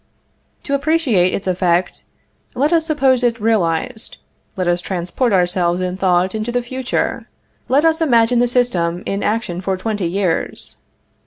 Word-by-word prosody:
To 280 - -3
appreciate 280 - +2
its 195 - -3
effect, 180 -1 0 0.5
let 290 +6 +1
us 325 -1 +2
suppose 270 -5 +2
it 240 -1 +1
realized; 220 +1 -1 0.4
let 185 -1 -1
us 175 0 +1
transport 185 +7 -2
ourselves 180 -2 +1
in 180 0 -2
thought 185 -1 +1
into 220 +2 -3
the 245 0 -1
future; 260 +1 -3 0.4
let 280 +5 +3
us 325 0 +3
imagine 240 -5 +3
the 245 - +3
system 185 -9 0
in 200 +1 -2
action 210 -5 -2
for 190 0 -1
twenty 205 -2 -2
years. 180 -1 -2
210 Hz, 150 wpm, -18 LUFS, 180-250 Hz, 0.5 s, let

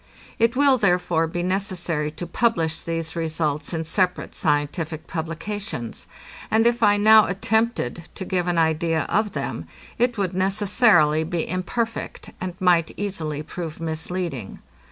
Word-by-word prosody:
It 230 +2 +3
will, 275 -1 +4
therefore, 175 -5 +2
be 175 +2 -3
necessary 180 -5 -1
to 160 +3 -7
publish 170 -4 0
these 165 -1 -4
results 160 -2 -1
in 165 -2 -2
separate 180 +2 0
scientific 155 +1 -1
publications; 165 - -5 0.4
and 225 +1 +3
if 235 0 +2
I 205 -2 +5
now 215 0 +7
attempted 195 - -1
to 190 - -5
give 180 -1 -1
an 175 -1 0
idea 160 -1 +2
of 210 0 +1
them, - - -4 0.3
it 245 -1 +2
would 190 -3 -1
necessarily 190 - +3
be 165 +1 -2
imperfect, 225 +6 -3
and 180 -1 -4
might 175 -3 +3
easily 160 -7 -3
prove 160 0 -6
misleading. 160 - -4
175 Hz, 135 wpm, -23 LUFS, 160-205 Hz, 0.4 s, now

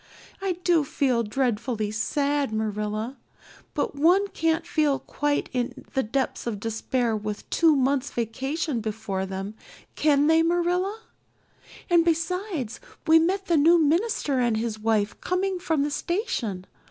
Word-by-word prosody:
I 385 -2 0
do 340 -4 +4
feel 260 -3 +1
dreadfully 225 -1 -1
sad, 280 +5 0
Marilla. 215 +3 -2 0.6
But - - -1
one 360 +7 +4
can't 325 -1 0
feel 305 -5 +2
quite 290 +1 -1
in 245 -1 -3
the 265 - +2
depths 265 +2 -2
of 215 -4 -2
despair 225 +2 -1
with 210 -1 -5
two 325 -3 +4
months' 270 0 +1
vacation 265 +4 -2
before 210 -3 -3
them, 195 +2 -5 0.4
can 290 -2 +3
they, 320 +1 +5
Marilla? 355 +5 0 0.9
And 345 -2 +5
besides, 335 - -1 0.3
we 325 0 +7
met 380 +4 0
the 340 -3 +2
new 330 +4 +6
minister 320 - +1
and 240 -3 +2
his 220 -1 -3
wife 215 -1 0
coming 370 +1 -1
from 320 -5 0
the 295 - -1
station. 285 - -2
280 Hz, 140 wpm, -25 LUFS, 225-335 Hz, 0.9 s, we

